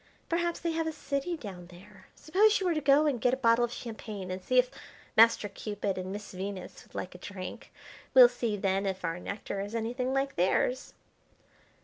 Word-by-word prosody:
Perhaps 340 Hz, 0 st, 0 dB
they 335 Hz, -, 0 dB
have 325 Hz, 0 st, -1 dB
a -, -, -1 dB
city 295 Hz, +3 st, -3 dB
down 185 Hz, -, -9 dB
there. 185 Hz, +2 st, -16 dB
Suppose 415 Hz, +7 st, +3 dB
you 385 Hz, -, -2 dB
were 355 Hz, -, +2 dB
to 305 Hz, -, -1 dB
go 285 Hz, +2 st, +5 dB
and 270 Hz, -6 st, 0 dB
get 250 Hz, +2 st, +3 dB
a -, -, -12 dB
bottle 235 Hz, -2 st, +4 dB
of 240 Hz, -, 0 dB
champagne 215 Hz, -6 st, -6 dB
and 185 Hz, 0 st, -5 dB
see 255 Hz, -, +1 dB
if 250 Hz, 0 st, +4 dB, 0.4 s
Master 225 Hz, -1 st, +6 dB
Cupid 205 Hz, -1 st, -3 dB
and 185 Hz, 0 st, -5 dB
Miss 205 Hz, +1 st, -7 dB
Venus 190 Hz, +1 st, -6 dB
would -, -, -22 dB
like 180 Hz, -, -4 dB
a 180 Hz, -, -11 dB
drink. 185 Hz, -1 st, -8 dB, 0.4 s
We'll 255 Hz, -2 st, +11 dB
see 240 Hz, -3 st, -2 dB
then 195 Hz, 0 st, 0 dB
if 190 Hz, -1 st, -3 dB
our 165 Hz, +1 st, -2 dB
nectar 200 Hz, +1 st, -5 dB
is 205 Hz, +3 st, -5 dB
anything 245 Hz, +3 st, -2 dB
like 270 Hz, +1 st, -1 dB
theirs." 190 Hz, +8 st, +1 dB
225 Hz, 205 wpm, -30 LUFS, 195-270 Hz, 0.4 s, We'll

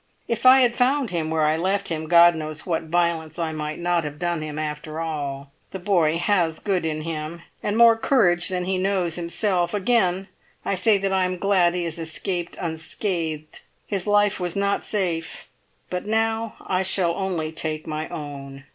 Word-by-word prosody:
If 235 Hz, +2 st, +1 dB
I 260 Hz, +1 st, +8 dB
had 240 Hz, -1 st, +3 dB
found 260 Hz, -1 st, +2 dB
him 165 Hz, -3 st, -2 dB
where 160 Hz, -1 st, +1 dB
I 155 Hz, +1 st, +3 dB
left 195 Hz, +4 st, 0 dB
him, 160 Hz, -1 st, -3 dB
God 170 Hz, +1 st, +7 dB
knows 155 Hz, -1 st, -5 dB
what 165 Hz, -2 st, -1 dB
violence 165 Hz, -1 st, 0 dB
I 165 Hz, -2 st, -1 dB
might 155 Hz, -1 st, -4 dB
not 175 Hz, -1 st, 0 dB
have 150 Hz, -1 st, -6 dB
done 175 Hz, -1 st, -2 dB
him 155 Hz, -1 st, -5 dB
after 155 Hz, +1 st, -4 dB
all. 145 Hz, -4 st, -4 dB, 0.2 s
The -, -, -6 dB
boy 175 Hz, -4 st, +2 dB
has 170 Hz, -3 st, +1 dB
good 185 Hz, -5 st, -1 dB
in 155 Hz, -1 st, -3 dB
him, 165 Hz, +1 st, -5 dB, 0.2 s
and 205 Hz, +1 st, -1 dB
more 230 Hz, -1 st, +7 dB
courage 180 Hz, -8 st, +3 dB
than 180 Hz, -1 st, -1 dB
he 185 Hz, 0 st, 0 dB
knows 185 Hz, -3 st, 0 dB
himself; 175 Hz, +1 st, 0 dB
again 195 Hz, -3 st, +1 dB, 0.4 s
I -, -, 0 dB
say 205 Hz, +3 st, +3 dB
that 195 Hz, 0 st, -1 dB
I 190 Hz, -1 st, +2 dB
am 180 Hz, 0 st, -2 dB
glad 180 Hz, -2 st, +2 dB
he 180 Hz, -, -1 dB
has 170 Hz, -1 st, -4 dB
escaped 170 Hz, +2 st, -4 dB
unscathed. 160 Hz, -1 st, -3 dB, 0.3 s
His 195 Hz, -3 st, -3 dB
life 205 Hz, -1 st, +3 dB
was 175 Hz, -2 st, -3 dB
not 200 Hz, 0 st, 0 dB
safe, 175 Hz, -6 st, -2 dB, 0.4 s
but 180 Hz, +2 st, -3 dB
now 225 Hz, 0 st, 0 dB
I 185 Hz, -1 st, -1 dB
shall 185 Hz, -2 st, +2 dB
only 175 Hz, -4 st, -2 dB
take 155 Hz, -1 st, -3 dB
my 155 Hz, 0 st, -4 dB
own. 140 Hz, -2 st, -7 dB
175 Hz, 185 wpm, -23 LUFS, 160-195 Hz, 0.4 s, I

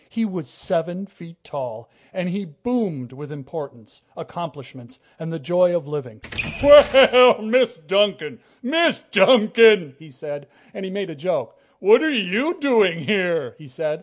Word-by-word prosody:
He 230 Hz, -1 st, -3 dB
was 185 Hz, -7 st, -7 dB
seven 175 Hz, +4 st, -4 dB
feet 170 Hz, -4 st, -17 dB
tall, 125 Hz, -5 st, -9 dB, 0.2 s
and 185 Hz, -1 st, -5 dB
he 195 Hz, +3 st, -5 dB
boomed 170 Hz, -, -5 dB
with 145 Hz, +2 st, -12 dB
importance, 140 Hz, -5 st, -11 dB, 0.2 s
accomplishments, 140 Hz, -7 st, -11 dB, 0.2 s
and 160 Hz, 0 st, -7 dB
the 165 Hz, -, -5 dB
joy 175 Hz, +3 st, 0 dB
of 165 Hz, -5 st, -4 dB
living. 130 Hz, -8 st, -8 dB, 0.4 s
"Well, 265 Hz, -4 st, +7 dB
Miss 240 Hz, -2 st, +1 dB
Duncan! 190 Hz, -1 st, -2 dB, 0.2 s
Miss 320 Hz, +4 st, 0 dB
Duncan!" 215 Hz, -, +4 dB
he 160 Hz, 0 st, -17 dB
said, 145 Hz, +1 st, -10 dB, 0.3 s
and 195 Hz, -, -8 dB
he -, -, -7 dB
made 195 Hz, -2 st, -6 dB
a -, -, -10 dB
joke. 180 Hz, +6 st, -4 dB, 0.2 s
"What 445 Hz, +4 st, +4 dB
are 315 Hz, -, 0 dB
you 255 Hz, -, -2 dB
doing 220 Hz, -, +1 dB
here?" 185 Hz, -5 st, -2 dB
he 150 Hz, -, -15 dB
said. 155 Hz, +4 st, -5 dB
175 Hz, 150 wpm, -20 LUFS, 150-220 Hz, 0.4 s, Well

